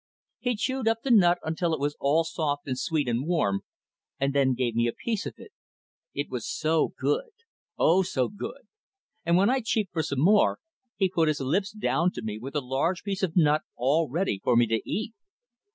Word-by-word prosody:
He 245 Hz, -1 st, 0 dB
chewed 260 Hz, +2 st, -2 dB
up 225 Hz, 0 st, +1 dB
the 270 Hz, -, 0 dB
nut 180 Hz, -6 st, +6 dB
until 160 Hz, +1 st, 0 dB
it -, -, -8 dB
was 145 Hz, +1 st, -1 dB
all 150 Hz, +4 st, +3 dB
soft 145 Hz, -3 st, -2 dB
and 130 Hz, -, -1 dB
sweet 150 Hz, 0 st, -1 dB
and 120 Hz, +4 st, -1 dB
warm, 100 Hz, -, +1 dB, 0.6 s
and 135 Hz, 0 st, +1 dB
then 135 Hz, -2 st, +3 dB
gave 120 Hz, -2 st, -1 dB
me 115 Hz, +1 st, +2 dB
a 115 Hz, -, -1 dB
piece 225 Hz, -4 st, -3 dB
of -, -, -7 dB
it. -, -, -13 dB, 0.6 s
It 145 Hz, +1 st, -2 dB
was 125 Hz, -3 st, -5 dB
so 160 Hz, 0 st, +1 dB
good! -, -, 0 dB, 0.5 s
oh, 180 Hz, +4 st, +4 dB
so 130 Hz, -8 st, 0 dB
good! -, -, -7 dB, 0.6 s
and 170 Hz, +1 st, +4 dB
when 200 Hz, +6 st, +4 dB
I 265 Hz, -, +2 dB
cheeped 220 Hz, -5 st, -1 dB
for 165 Hz, -, +1 dB
some 140 Hz, -3 st, -2 dB
more, 205 Hz, +6 st, +4 dB, 0.4 s
he 190 Hz, -, +2 dB
put 170 Hz, -3 st, +1 dB
his 155 Hz, -1 st, +1 dB
lips 170 Hz, +10 st, 0 dB
down 180 Hz, -4 st, +1 dB
to -, -, -6 dB
me 110 Hz, -1 st, -4 dB
with 135 Hz, +5 st, -8 dB
a 145 Hz, -, +1 dB
large 140 Hz, +8 st, -1 dB
piece 195 Hz, -2 st, -3 dB
of 185 Hz, -2 st, -1 dB
nut 150 Hz, -2 st, +4 dB
all 145 Hz, +6 st, +1 dB
ready 145 Hz, -, -1 dB
for -, -, +3 dB
me 120 Hz, 0 st, +5 dB
to 115 Hz, 0 st, 0 dB
eat. 220 Hz, +1 st, -2 dB
160 Hz, 210 wpm, -27 LUFS, 135-195 Hz, 0.6 s, nut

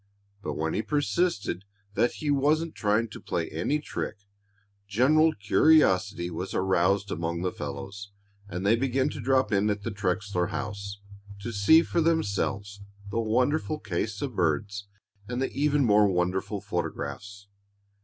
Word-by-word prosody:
But -, -, -3 dB
when 80 Hz, +1 st, -1 dB
he 105 Hz, -, 0 dB
persisted 145 Hz, -, 0 dB, 0.3 s
that 120 Hz, -, +2 dB
he 150 Hz, -1 st, -2 dB
wasn't 155 Hz, +4 st, +2 dB
trying 105 Hz, +2 st, +1 dB
to -, -, -10 dB
play 85 Hz, -2 st, -2 dB
any 110 Hz, -, 0 dB
trick 145 Hz, -6 st, -5 dB, 0.7 s
general 150 Hz, +10 st, +4 dB
curiosity 100 Hz, -, +3 dB
was 90 Hz, +3 st, -5 dB
aroused 95 Hz, +2 st, +2 dB
among 85 Hz, +1 st, -2 dB
the 90 Hz, -, 0 dB
fellows, 95 Hz, +8 st, -7 dB, 0.4 s
and 90 Hz, 0 st, -4 dB
they 105 Hz, +3 st, +5 dB
began 130 Hz, +3 st, +1 dB
to 145 Hz, -, -6 dB
drop 130 Hz, +1 st, +2 dB
in 105 Hz, +1 st, +2 dB
at 100 Hz, -1 st, -2 dB
the -, -, -3 dB
Trexler 100 Hz, -2 st, -1 dB
house 100 Hz, -2 st, -5 dB, 0.4 s
to 120 Hz, -, -4 dB
see 135 Hz, +12 st, +6 dB
for 170 Hz, -, 0 dB
themselves 100 Hz, -10 st, 0 dB, 0.3 s
the 115 Hz, -, 0 dB
wonderful 125 Hz, +8 st, +1 dB
case 105 Hz, +1 st, -3 dB
of 130 Hz, -5 st, -4 dB
birds 100 Hz, +4 st, -1 dB, 0.4 s
and 125 Hz, 0 st, -3 dB
the 135 Hz, -, -1 dB
even 145 Hz, -1 st, +2 dB
more 105 Hz, -2 st, +5 dB
wonderful 95 Hz, +2 st, -1 dB
photographs. 100 Hz, 0 st, -5 dB
105 Hz, 145 wpm, -27 LUFS, 95-135 Hz, 0.7 s, see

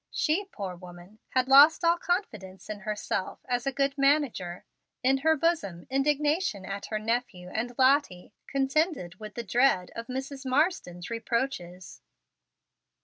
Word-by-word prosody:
She, 340 Hz, +7 st, 0 dB
poor 200 Hz, -, -6 dB
woman, 175 Hz, +3 st, -13 dB, 0.2 s
had 255 Hz, 0 st, +3 dB
lost 290 Hz, +5 st, +7 dB
all 340 Hz, +1 st, +3 dB
confidence 215 Hz, -, -3 dB
in 210 Hz, -, -6 dB
herself 210 Hz, -1 st, -3 dB
as 245 Hz, 0 st, -2 dB
a -, -, +2 dB
good 275 Hz, 0 st, 0 dB
manager. 275 Hz, -, +1 dB, 0.4 s
In 265 Hz, +1 st, +3 dB
her 320 Hz, +3 st, +3 dB
bosom 270 Hz, -, -1 dB
indignation 290 Hz, -, +1 dB
at 200 Hz, +1 st, -5 dB
her 215 Hz, -, -2 dB
nephew 215 Hz, -5 st, -3 dB
and 235 Hz, +5 st, -3 dB
Lottie 260 Hz, -9 st, +2 dB
contended 275 Hz, -, 0 dB
with 215 Hz, -1 st, -9 dB
the 235 Hz, -, -4 dB
dread 230 Hz, -4 st, +2 dB
of 230 Hz, 0 st, -6 dB
Mrs. 265 Hz, +2 st, -5 dB
Marsden's 255 Hz, -, -1 dB
reproaches. 230 Hz, -7 st, -3 dB
245 Hz, 140 wpm, -28 LUFS, 195-280 Hz, 0.4 s, lost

